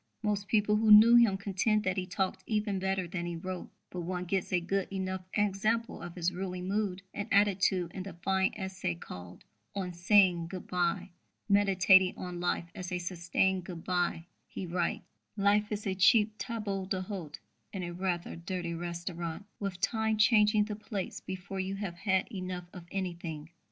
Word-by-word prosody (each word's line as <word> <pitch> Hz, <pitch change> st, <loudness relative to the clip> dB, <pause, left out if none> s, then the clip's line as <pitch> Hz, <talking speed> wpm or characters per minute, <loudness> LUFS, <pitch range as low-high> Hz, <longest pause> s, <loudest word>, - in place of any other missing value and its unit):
Most 205 Hz, -1 st, 0 dB
people 210 Hz, -1 st, +3 dB
who 220 Hz, 0 st, +2 dB
knew 220 Hz, +3 st, +10 dB
him 230 Hz, -5 st, +6 dB
contend 205 Hz, +2 st, +1 dB
that 185 Hz, -1 st, 0 dB
he 185 Hz, -2 st, -2 dB
talked 190 Hz, 0 st, -2 dB
even 210 Hz, -3 st, 0 dB
better 190 Hz, -1 st, -1 dB
than 175 Hz, 0 st, -4 dB
he 175 Hz, -, -3 dB
wrote; 185 Hz, +2 st, -5 dB, 0.2 s
but 180 Hz, -, -5 dB
one 180 Hz, +1 st, -3 dB
gets 190 Hz, +1 st, -1 dB
a 180 Hz, -, +3 dB
good 190 Hz, +2 st, -1 dB
enough 190 Hz, -1 st, -2 dB
example 215 Hz, +3 st, 0 dB
of 175 Hz, -, -7 dB
his 180 Hz, 0 st, 0 dB
ruling 180 Hz, 0 st, -4 dB
mood 195 Hz, -1 st, -1 dB
and 205 Hz, -, -4 dB
attitude 195 Hz, -3 st, +3 dB
in 190 Hz, -, -5 dB
the 190 Hz, 0 st, -7 dB
fine 190 Hz, +2 st, +1 dB
essay 190 Hz, -, -3 dB
called 90 Hz, +1 st, -10 dB, 0.3 s
On 185 Hz, -3 st, -3 dB
Saying 175 Hz, -1 st, +4 dB
Good 185 Hz, +1 st, -7 dB
bye. 180 Hz, +1 st, -1 dB, 0.4 s
Meditating 190 Hz, -2 st, +5 dB
on 180 Hz, -1 st, -5 dB
life 170 Hz, -1 st, -1 dB
as 180 Hz, -1 st, -6 dB
"a 180 Hz, -, 0 dB
sustained 180 Hz, +1 st, 0 dB
good 175 Hz, -3 st, -7 dB
bye," 175 Hz, -2 st, 0 dB, 0.2 s
he 190 Hz, -, -6 dB
writes: 175 Hz, 0 st, -1 dB, 0.3 s
Life 205 Hz, +1 st, +3 dB
is 210 Hz, 0 st, -3 dB
a 195 Hz, -, 0 dB
cheap 210 Hz, +3 st, +4 dB
table 205 Hz, -5 st, -3 dB
d'hôte 185 Hz, -5 st, -4 dB, 0.4 s
in 190 Hz, -2 st, -4 dB
a 175 Hz, -, -4 dB
rather 180 Hz, -1 st, -2 dB
dirty 170 Hz, 0 st, -4 dB
restaurant, 170 Hz, +1 st, -4 dB
with 195 Hz, -3 st, -4 dB
Time 220 Hz, -1 st, +1 dB
changing 210 Hz, -1 st, +5 dB
the 210 Hz, -1 st, -4 dB
plates 205 Hz, -2 st, -5 dB
before 190 Hz, +1 st, -6 dB
you 190 Hz, +1 st, -2 dB
have 195 Hz, -3 st, -4 dB
had 190 Hz, 0 st, +1 dB
enough 185 Hz, -3 st, -5 dB
of 175 Hz, -2 st, -9 dB
anything. 170 Hz, -5 st, -4 dB
190 Hz, 175 wpm, -31 LUFS, 175-205 Hz, 0.4 s, knew